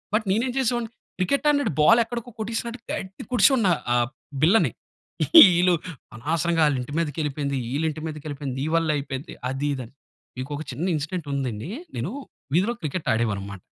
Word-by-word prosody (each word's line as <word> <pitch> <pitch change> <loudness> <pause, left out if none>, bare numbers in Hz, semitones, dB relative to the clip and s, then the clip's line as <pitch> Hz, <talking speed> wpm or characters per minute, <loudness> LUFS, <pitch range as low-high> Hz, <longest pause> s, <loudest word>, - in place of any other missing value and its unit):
But 215 0 +1
నీనేం 235 +6 +1
చేసేవాడిని? 240 -2 0 0.3
Cricket 230 +12 +1
ఆడినట్టు 285 - +2
ball 225 +10 +6
ఎక్కడికో 240 +1 -6
కొట్టీసినట్టు, 230 +2 -3
గట్టిగ 190 +2 -6
కొట్టిసివాడిని 230 -2 +5 0.3
ఆ - - +4 0.5
బిళ్ళని. 195 +8 +4 0.9
ఈళ్ళు 180 +1 +4 0.4
"అనవసరంగా 165 +6 0
ఆళ్ళింటి 135 -1 -2
మీదకెళిపోయింది, 145 -3 -1 0.2
ఈళ్ళింటి 155 +1 -1
మీదకెళిపోయింది, 145 -3 -5
నీ - - -1
వల్లే 165 -2 +2
అయిపోయింది." 140 +2 -5 0.2
అది 135 +2 -2
ఇది 130 - -5
అని. 115 - -18 0.4
మీకొక 145 +4 -4
చిన్న 165 - -3
ఇన్సిడెంట్ 155 +2 -4
ఉందండి. 130 -1 -3 0.3
నేను, - - -2 0.4
వీధిలో 205 +8 +2
క్రికెట్ 155 +2 -4
ఆడేవాడినిమాట. 100 -4 -2
160 Hz, 140 wpm, -24 LUFS, 140-215 Hz, 0.9 s, ball